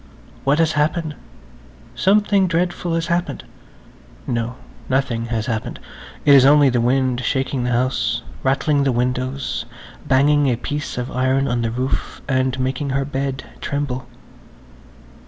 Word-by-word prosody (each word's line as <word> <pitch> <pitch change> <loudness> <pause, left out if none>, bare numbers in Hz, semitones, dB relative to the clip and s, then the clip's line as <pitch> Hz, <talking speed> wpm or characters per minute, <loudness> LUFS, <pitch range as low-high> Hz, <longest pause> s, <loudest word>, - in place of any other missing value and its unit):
What 140 +2 +3
has 160 -1 +3
happened? 155 +1 0 0.8
Something 200 0 +3
dreadful 175 0 -1
has 165 0 0
happened. 170 +1 -1 0.8
No–nothing 120 0 -2
has 115 -2 -2
happened. 110 -2 -3 0.5
It 145 - +7
is 135 -2 +8
only 145 0 +6
the 120 -1 +1
wind 130 0 +1
shaking 130 -1 -1
the - - 0
house, 120 -1 0 0.2
rattling 140 +2 +2
the 135 - +2
windows, 125 +1 -2 0.4
banging 145 +2 +4
a 125 - +2
piece 145 +5 -4
of 125 +1 -3
iron 130 +2 +1
on 120 0 0
the 115 - 0
roof 125 +3 -3
and 130 -1 0
making 130 +2 -1
her 135 0 0
bed 135 -1 -3 0.2
tremble. 140 -3 -3
135 Hz, 135 wpm, -20 LUFS, 125-145 Hz, 0.8 s, is